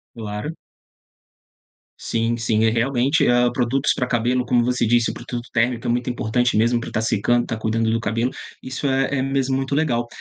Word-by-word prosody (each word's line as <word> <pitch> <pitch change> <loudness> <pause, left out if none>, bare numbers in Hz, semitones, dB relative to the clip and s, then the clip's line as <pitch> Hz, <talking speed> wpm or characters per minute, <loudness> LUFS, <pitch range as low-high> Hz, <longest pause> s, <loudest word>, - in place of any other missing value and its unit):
Claro. 105 +5 -5 1.5
Sim, 115 +1 -1
sim. 110 -1 +1
E 110 - +4
realmente, 125 +5 +1
hã, 120 0 +4
produtos 130 +3 +1
pra 125 - -1
cabelo 125 +1 0
como 120 -1 +2
você 125 -1 +1
disse, 120 +1 +2
produto 120 0 -7
térmico 120 0 0
é - - +1
muito 120 +1 -1
importante 120 0 0
mesmo 120 +2 +2
pra - - -6
tá - - -1
secando, 110 +2 +1
tá 115 - -3
cuidando 110 +1 0
do 115 0 0
cabelo, 115 +3 -1 0.3
isso 130 +2 -4
é 135 0 +2 0.2
é - - +1
mesmo 135 -1 0
muito 135 +1 -2
legal. 125 -6 +1
120 Hz, 180 wpm, -21 LUFS, 115-125 Hz, 1.5 s, E